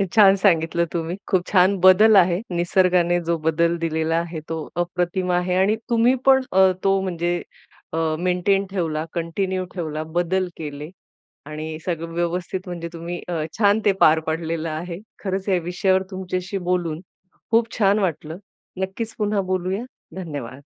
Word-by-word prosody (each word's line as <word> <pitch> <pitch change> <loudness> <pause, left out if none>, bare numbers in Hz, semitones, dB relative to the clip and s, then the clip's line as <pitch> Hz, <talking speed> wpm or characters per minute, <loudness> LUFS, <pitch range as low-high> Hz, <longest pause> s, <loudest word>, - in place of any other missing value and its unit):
छान 200 -3 +7
सांगितलं 170 -3 +2
तुम्ही. 170 0 -2
खूप 180 -2 +1
छान 190 +1 +4
बदल 190 +4 +7
आहे. 180 -1 +4
निसर्गाने 175 0 +2
जो 170 0 +1
बदल 165 +2 +1
दिलेला 160 0 -1
आहे 170 -1 -3
तो 160 -1 -4 0.2
अप्रतिम 180 +1 -2
आहे. 180 0 +1
आणि 195 +3 +3
तुम्ही 235 +1 +4
पण 265 0 +6
अ, 190 0 +6
तो 195 0 +3
म्हणजे 175 -2 -1 0.6
अ, 160 - -1 0.2
मेंटेन 185 +2 +1
ठेवला, 160 -5 -2
कंटिन्यू 185 +3 -2
ठेवला, 155 -4 -4
बदल 185 +2 +1
केले 150 -1 -6 0.6
आणि 155 +1 -6
सगळं 165 -2 -3
व्यवस्थित 175 +2 -2
म्हणजे 170 -1 -5
तुम्ही 170 +1 -6
अ, 180 - -3 0.3
छान 205 0 +4
ते 205 - +6
पार 155 +1 +6
पाडलेलं 165 0 -2
आहे. 170 +3 -5 0.2
खरंच 190 0 -2
या 185 -2 +3
विषयावर 185 +2 +1
तुमच्याशी 185 +1 -4
बोलून 170 -3 -1 0.5
खूप 230 0 +3
छान 205 0 +4
वाटलं. 165 -3 -2 0.4
नक्कीच 205 +4 -4
पुन्हा 210 -1 +1
बोलूया. 185 +4 -1 0.3
धन्यवाद. 145 -8 -6
180 Hz, 145 wpm, -22 LUFS, 165-190 Hz, 0.6 s, छान